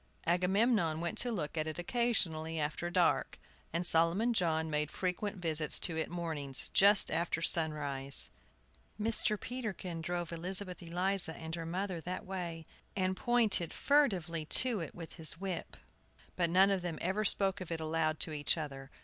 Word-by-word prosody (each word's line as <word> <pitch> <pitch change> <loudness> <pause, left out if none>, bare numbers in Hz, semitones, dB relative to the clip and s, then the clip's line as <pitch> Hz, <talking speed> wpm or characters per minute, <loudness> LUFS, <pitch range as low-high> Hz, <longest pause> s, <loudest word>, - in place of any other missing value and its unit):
Agamemnon 180 0 +2
went 170 +5 -3
to 240 +2 +1
look 170 -9 -4
at 155 - -1
it 155 - -5
occasionally 175 -7 0
after 150 +3 -2
dark, 175 - +1 0.3
and 170 +2 -1
Solomon 175 +9 +3
John 160 -6 +1
made 150 -1 -1
frequent 195 +4 -3
visits 160 -3 +1
to 165 - -1
it 160 - -2
mornings, 155 -6 -3
just 200 +1 +5
after 165 0 0
sunrise. 145 -5 +2 0.7
Mr. 215 -1 0
Peterkin 200 -9 -5
drove 175 0 -3
Elizabeth 180 +2 -2
Eliza 175 0 0
and 160 0 -7
her 165 -1 -4
mother 180 0 -3
that 180 +3 -5
way, 175 -4 -5 0.3
and 185 -1 0
pointed 225 -7 +3
furtively 185 - +1
to 240 +6 +3
it 165 -4 -6
with 165 -1 -9
his 160 0 +3
whip; 190 -3 -5 0.6
but 170 -2 +1
none 190 +3 +5
of 195 -2 0
them 175 -3 -4
ever 190 +5 -1
spoke 195 -2 +3
of 180 - -7
it 165 - -2
aloud 160 0 -1
to 160 - -1
each 145 +2 0
other. 135 -3 -6
175 Hz, 160 wpm, -33 LUFS, 160-195 Hz, 0.7 s, just